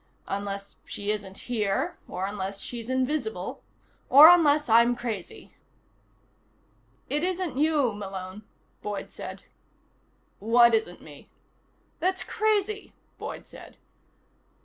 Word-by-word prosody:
Unless 200 0 -5
she 205 0 -3
isn't 200 -2 -5
here. 210 -5 -1
Or 185 +1 -3
unless 195 -1 -4
she's 235 +1 -6
invisible. 255 -7 -2 0.5
Or 295 +4 +10
unless 300 -4 +4
I'm 235 +1 +5
crazy." 225 -7 -6 1.5
"It 295 +2 -1
isn't 365 -5 -1
you, 295 -6 +2
Malone," 195 -1 -7 0.4
Boyd 205 -1 -5
said. - - -8 1.0
"What 235 +2 +5
isn't 220 -6 -1
me?" 145 -2 -13 0.7
"That's 375 +2 0
crazy," 425 -1 -1 0.3
Boyd - - -7
said. - - -13
230 Hz, 100 wpm, -27 LUFS, 200-295 Hz, 1.5 s, Or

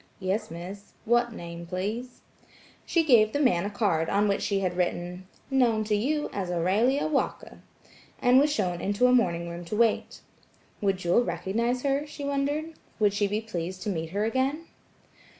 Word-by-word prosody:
"Yes, 200 +3 -2
Miss–. 185 +5 -9
What 240 +1 +2
name 170 -4 -8
please?" 215 +8 -4 0.7
She 335 - +3
gave 225 -8 +5
the 285 - 0
man 220 -11 +3
a - - -3
card 195 -7 0
on 205 +1 +2
which 200 - 0
she 200 -1 0
had 180 -2 -1
written, 180 +1 -2 0.2
"Known 240 -5 +3
to 210 0 0
you 295 +8 0
as 190 -3 -3
Aurelia 200 +11 +2
Walker," 300 -3 -2 0.6
and 250 0 +5
was 295 +2 +3
shown 180 -9 -1
into 205 +5 +1
a 250 - +5
morning 170 -8 +2
room 170 +1 -6
to 190 - -4
wait, 230 0 +1 0.6
Would 195 -2 +1
Jewel 180 +6 +2
recognize 235 +4 -1
her, 280 +1 0
she 295 0 -8
wondered. 285 +3 -1 0.2
Would 210 -2 +3
she 205 0 +1
be 210 +2 -1
pleased 185 -3 -5
to - - -2
meet 165 -3 -3
her 205 +4 -1
again? 265 +7 0
210 Hz, 175 wpm, -27 LUFS, 185-250 Hz, 0.7 s, gave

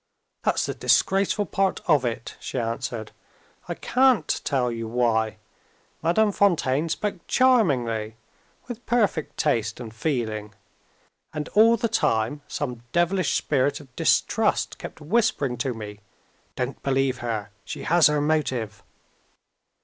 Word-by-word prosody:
"That's - - +1
the - - -3
disgraceful 200 +2 +2
part 195 +1 0
of 150 -6 +4
it," 115 -1 -4
she - - -6
answered. 115 -1 -3 0.6
"I - - -3
can't 260 -2 +2
tell 125 -4 0
you 115 -1 -4
why. 110 -2 +1 0.6
Madame 205 +6 +3
Fontaine 165 -7 +2
spoke 195 +2 -3
charmingly 125 - +2 0.5
with 245 -1 -7
perfect 210 - 0
taste 115 -7 0
and 115 -3 -8
feeling. 110 -5 -3 0.8
And 150 0 -4
all 225 +3 +5
the 230 - 0
time 115 - 0
some 125 -5 -4
devilish 175 0 +1
spirit 140 -1 +1
of 135 -4 -16
distrust - - +1
kept - - -9
whispering 165 - +1
to 125 0 -2
me, 105 -2 -8 0.6
"Don't 125 +2 -3
believe 135 -2 0
her; 110 -4 -3
she - - -7
has 170 -1 +5
her 150 0 +1
motive!" 130 -9 -1
140 Hz, 125 wpm, -25 LUFS, 115-180 Hz, 0.8 s, all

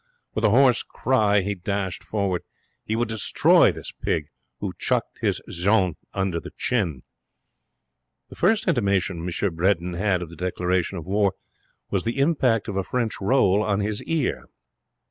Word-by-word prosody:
With - - -2
a - - +5
hoarse 125 +2 +5
cry 105 -5 +1
he 100 +2 -2
dashed 95 0 -3
forward. 100 -4 -1 0.4
He 110 - -2
would 120 +1 0
destroy 110 -2 +4
this - - -8
pig 75 -2 -2 0.3
who - - -3
chucked - - -1
his - - 0
Jeanne 95 0 +2 0.2
under 95 -3 -1
the - - -9
chin. 85 - -1 1.3
The - - -11
first 220 +4 +2
intimation 100 - +1
M. 90 +1 -2
Bredin 90 0 +1
had 90 0 0
of 85 - -10
the - - -10
declaration 90 +1 -1
of 85 - -7
war 100 +1 +1 0.6
was 95 -2 0
the 115 +4 -2
impact 135 -7 +2
of 100 -3 -3
a 95 - 0
French 115 0 -2
roll 100 -2 +3
on 105 -2 0
his 105 0 -2
ear. 160 -5 -1
100 Hz, 160 wpm, -24 LUFS, 90-115 Hz, 1.3 s, a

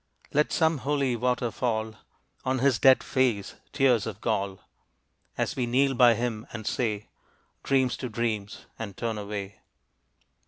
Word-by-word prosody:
Let 150 +1 +2
some 160 -2 +2
holy 135 -2 0
water 125 0 0
fall 110 -3 -1 0.5
On 130 0 0
his 130 -2 +2
dead 130 -1 +6
face, 120 -7 0 0.2
tears 125 -6 +3
of 105 -2 -6
gall 100 -4 -1 0.8
As - - -1
we 125 -2 -1
kneel 135 +3 +3
by 120 -2 +6
him 115 -1 -3
and 110 -3 -7
say, 105 -3 -2 0.5
"Dreams 130 -2 +2
to 125 - -5
dreams," 110 -3 -3
and 100 -4 -6
turn 115 -2 -2
away. 100 -1 -6
120 Hz, 145 wpm, -27 LUFS, 110-130 Hz, 0.8 s, dead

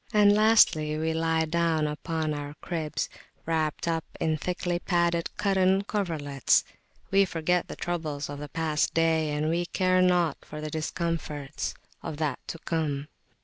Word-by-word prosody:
And 205 -2 +6
lastly, 205 -8 +4
we 160 +1 0
lie 160 0 +1
down 165 -1 +1
upon 155 +1 -2
our 145 0 -5
cribs, 160 -4 -3 0.4
wrapped 160 -1 -1
up 165 -1 0 0.2
in 160 -1 +1
thickly 175 +2 -2
padded 170 -2 +1
cotton 190 -1 +3
coverlets; 160 - +1 0.5
we 195 0 +6
forget 175 0 0
the - - -7
troubles 155 -5 -3
of 145 0 -6
the 145 0 -7
past 155 -1 0
day, 160 -1 +3
and 150 +1 -1
we 170 +2 0
care 185 0 +2
nought 175 -4 +3
for 150 - -8
the 155 0 -5
discomforts 155 -2 -3 0.3
of 150 - -5
that 150 -4 -1
to - - -5
come. 150 -4 -2
160 Hz, 150 wpm, -27 LUFS, 150-175 Hz, 0.5 s, And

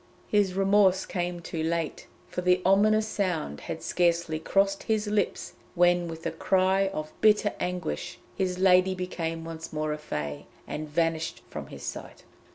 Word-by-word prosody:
His 200 -3 +2
remorse 195 -1 +4
came 175 -1 -3
too 165 -1 -4
late, 165 0 -2 0.2
for 180 - -4
the 180 0 +3
ominous 215 +3 +4
sound 180 - -2
had - - -6
scarcely 170 -2 +1
crossed 195 +4 +1
his 220 -1 0
lips 205 -2 -1 0.2
when 175 0 +4
with 165 0 -8
a 165 - 0
cry 190 +3 +2
of 155 -5 -5
bitter 210 -1 +4
anguish, 180 - -3 0.2
his 185 -1 -1
lady 185 0 +4
became 165 -3 -4
once 165 0 -7
more 155 0 -1
a 150 - -6
Fée, 75 - -5 0.2
and 155 0 -5
vanished 165 +1 -1
from - - -6
his - - -10
sight. - - -7
180 Hz, 160 wpm, -27 LUFS, 165-195 Hz, 0.2 s, remorse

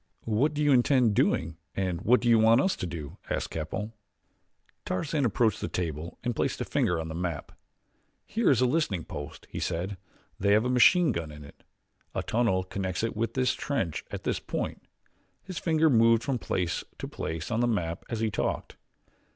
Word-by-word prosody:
"What 130 +8 +1
do 150 - 0
you 145 - +4
intend 125 -3 +4
doing 80 -4 +1 0.2
and 90 -2 -1
what 120 +4 +4
do 120 - -1
you 115 -1 +6
want 115 +2 +6
us 190 +8 +2
to 90 - -3
do?" 80 -5 -7
asked - - -2
Capell. 95 +7 -4 0.9
Tarzan 140 - -1
approached 110 -2 +1
the - - -1
table 80 -2 -4
and 120 -1 -1
placed - - -1
a - - -2
finger 90 -2 +1
on 80 - -4
the 80 - -5
map. 85 -4 -3 0.7
"Here 225 +1 +1
is 130 -3 +4
a - - +5
listening 125 - 0
post," 70 0 -8
he - - -4
said; 95 +4 -2 0.4
"they 100 +1 +3
have 110 +3 +4
a 125 - +1
machine 155 +6 +6
gun 85 -7 -4
in 75 0 -10
it. 70 - -15 0.5
A - - -1
tunnel 110 -6 +1
connects 95 +1 -3
it 115 - -1
with 115 +2 -2
this 130 -1 +2
trench 95 - -2
at - - -6
this - - 0
point." - - -4 0.6
His 185 -2 -5
finger 160 -1 +3
moved 115 -4 +5
from 135 -3 -1
place 90 -5 -1
to - - -5
place 80 +6 -5
on 115 - +1
the 120 - +3
map 85 -7 -1
as 115 -1 -3
he 110 -1 +1
talked. 90 - -2
110 Hz, 195 wpm, -28 LUFS, 85-125 Hz, 0.9 s, you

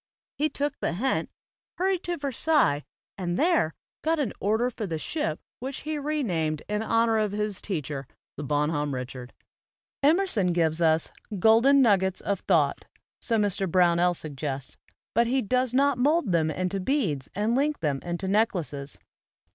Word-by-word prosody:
He 305 +2 +1
took 290 0 -3
the - - -1
hint, 255 +9 -1 0.5
"hurried 375 0 +1
to 350 0 -2
Ver 280 -1 -3
sailles, 265 - +2 0.3
and 175 -1 -2
there 320 - +2 0.3
got 325 +1 +1
an 280 -8 -1
order 220 +5 +1
for 225 -3 -5
the 165 -3 -2
ship 160 - -3 0.2
which 265 +2 -5
he 305 0 -3
renamed 185 - -1
in 210 0 -1
honor 225 0 +2
of 210 -2 0
his 210 -1 -2
teacher, 145 -8 -4 0.3
the - - -6
'Bon 150 +2 0
homme 145 -3 -1
Richard/" 125 0 -7 0.7
Kmcrson 290 - +3
gives 165 -1 +1
us 160 -1 +2 0.3
"golden 235 +8 +5
nuggets 190 -4 +2
of 200 -2 -1
thought," - - +1 0.4
so 230 - +1
Mr. 200 -3 +1
Brownell 175 0 +3
suggests; 140 -3 -4 0.4
but 235 +2 +3
he 260 +3 +2
does 250 +3 +1
not 275 0 +2
mold 290 - +2
into 175 +4 0
beads 185 - -1
and 210 +4 +1
link 290 +3 +1
them 145 -4 0
into 175 +2 -4
neckhios. 180 -9 -1
205 Hz, 155 wpm, -26 LUFS, 160-265 Hz, 0.7 s, golden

